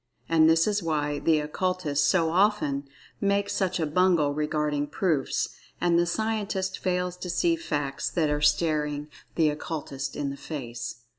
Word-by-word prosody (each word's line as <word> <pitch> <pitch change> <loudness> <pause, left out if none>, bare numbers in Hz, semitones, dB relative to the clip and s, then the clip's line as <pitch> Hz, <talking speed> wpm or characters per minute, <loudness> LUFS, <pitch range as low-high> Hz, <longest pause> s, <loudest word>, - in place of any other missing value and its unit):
And 160 -1 +5
this 165 0 +4
is 210 -1 0
why 150 -3 -1
the 160 -2 +3
Occultists 150 -2 0
so 165 0 +3
often 170 -8 +1 0.3
make 200 0 +1
such 185 -2 0
a 160 - +1
bungle 160 -2 +3
regarding 150 -1 -1
"proofs" 155 -2 0 0.3
and 170 -1 +3
the 175 - +2
Scientist 205 -1 -1
fails 180 -1 -1
to 180 - -6
see 335 - +2
"facts" 145 - -2
that 155 -4 0
are 150 0 0
staring 150 -1 +1 0.3
the 160 -2 +4
Occultist 140 -3 -5
in 140 -1 -2
the 140 - -7
face. 120 -6 -6
160 Hz, 155 wpm, -27 LUFS, 145-185 Hz, 0.3 s, And